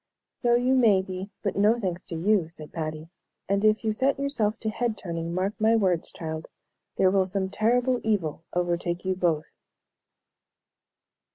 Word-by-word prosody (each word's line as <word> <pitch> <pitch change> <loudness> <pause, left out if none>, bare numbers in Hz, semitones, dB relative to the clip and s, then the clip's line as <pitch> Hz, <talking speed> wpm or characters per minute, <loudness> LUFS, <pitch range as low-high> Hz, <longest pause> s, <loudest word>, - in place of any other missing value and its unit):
"So 240 -1 +2
you 250 +2 +2
may 220 -7 +5
be, 190 +1 -6
but 200 - -1
no 210 +4 +3
thanks 185 -4 -3
to 170 - -6
you," 180 0 +2
said 155 -2 -10
Patty, 155 0 -4 0.4
"and 200 +1 +1
if 215 +1 +3
you 215 - +2
set 265 +5 +1
yourself 240 -6 0
to 220 - -1
head 230 -1 -1
turning, 165 -2 -4
mark 185 +4 -1
my 220 +1 +4
words, 185 -6 +1
child, 160 -1 -6 0.5
there 185 -1 +4
will 190 -1 +2
some 190 0 -2
terrible 245 +4 +2
evil 185 -8 -1
overtake 175 0 -1
you 190 - +1
both." 170 -4 0
195 Hz, 165 wpm, -26 LUFS, 175-220 Hz, 0.5 s, may